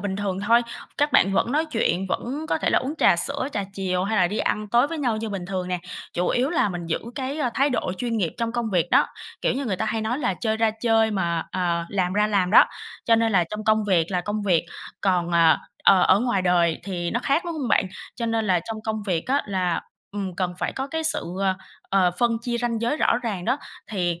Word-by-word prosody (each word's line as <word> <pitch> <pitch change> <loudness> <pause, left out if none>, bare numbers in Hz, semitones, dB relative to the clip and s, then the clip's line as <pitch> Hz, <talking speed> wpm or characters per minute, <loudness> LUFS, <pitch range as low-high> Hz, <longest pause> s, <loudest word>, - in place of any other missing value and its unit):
bình 190 -1 -3
thường 195 -2 -2
thôi. 235 +1 +5 0.4
Các 290 +1 +2
bạn 195 +1 +4
vẫn 235 - +1
nói 310 +3 +2
chuyện, 210 - 0
vẫn 280 +11 -3
có - - +1
thể - - 0
là - - +4
uống 275 +4 -4
trà 170 - +5
sữa, 280 +7 -1
trà 205 - -2
chiều 185 -1 -1
hay 220 +2 -1
là 180 - +5
đi 205 +5 -3
ăn 210 0 -1
tối 240 +5 +4
với 325 0 -5
nhau 240 -6 0
như 220 0 -3
bình 190 -3 -5
thường 185 -1 -3
nè, 180 -1 -1 0.3
chủ 175 +1 0
yếu 255 +4 +1
là 310 -11 +2
mình 175 -2 -5
giữ 165 - 0 0.2
cái, 270 +3 -3
a, 260 -5 0
thái 275 +2 +2
độ 185 - -1
chuyên 235 -2 -1
nghiệp 180 -6 0
trong 230 -1 -1
công 235 -3 -2
việc 175 -2 +1
đó. - - +5 0.3
Kiểu - - +1
như 275 - -2
người 205 -7 -1
ta 220 - -1
hay 220 +1 -1
nói 225 +5 -1
là 240 -10 0
chơi 220 +2 -1
ra 225 -1 +2
chơi 225 -1 +3
mà, 170 -5 0
à, 170 -2 -1
làm 185 -2 0
ra 210 +1 +2
làm 195 -4 +1
đó. 215 - +8 0.4
Cho 230 -1 +4
nên 225 -1 +1
là 180 -3 +4
trong 215 0 -5
công 215 -1 +3
việc 175 -5 +2
là 180 -1 0
công 210 +2 -3
việc, 180 -5 +2 0.4
còn, 180 -3 +1
ờ, 165 -1 +5 0.3
ờ, 190 -2 +6
ở 190 +3 +5
ngoài 240 -7 +1
đời 175 -2 +2
thì 175 -3 -3
nó 240 - -1
khác, 280 +5 +2
đúng 340 - -3
hông 275 -6 -3
bạn? 200 - +3 0.3
Cho 235 - -2
nên 225 -1 0
là 180 -3 +3
trong 220 -1 -5
công 220 -1 -2
việc 170 -4 -1
á 275 +3 +1
là, 185 -3 0 0.3
ừm, 195 -3 -4
cần 180 -2 -1
phải - - -2
có 265 +1 -3
cái 320 +2 -3
sự, - - +1 0.2
ờ, 190 -1 +2 0.4
ờ, 190 -2 +4
phân 235 -1 +2
chia 240 -1 -2
ranh 230 -2 -1
giới 240 +6 0
rõ 235 - +2
ràng 200 -6 -3
đó. 255 +4 +1 0.3
Thì, 175 -4 -1
210 Hz, 260 wpm, -24 LUFS, 185-240 Hz, 0.4 s, đó